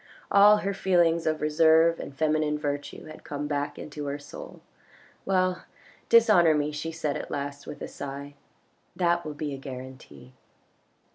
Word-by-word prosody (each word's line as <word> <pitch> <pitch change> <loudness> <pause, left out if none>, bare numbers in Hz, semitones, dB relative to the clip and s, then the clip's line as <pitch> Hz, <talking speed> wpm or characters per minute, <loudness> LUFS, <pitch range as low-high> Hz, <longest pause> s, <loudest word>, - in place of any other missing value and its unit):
All 205 +1 +7
her 200 - 0
feelings 170 -4 +2
of 155 0 0
reserve 160 +2 +4
and - - -6
feminine 155 -1 +1
virtue 145 -1 -4
had 155 - -12
come 145 0 -5
back 145 0 -2
into 150 -1 -7
her 140 +1 -3
soul. 145 0 -11 0.3
" - - -28
Well, 185 -1 +1 0.4
dishonour 210 -9 +6
me," 150 0 0
she 155 +2 -4
said 155 -3 -3
at - - -7
last 140 0 -5
with - - -7
a - - -4
sigh, 140 +1 -7 0.3
" - - -41
that 175 -1 +1
will 150 -1 -6
be 145 -1 -4
a 135 - -7
guarantee." 130 -1 -10
150 Hz, 165 wpm, -27 LUFS, 145-170 Hz, 0.4 s, All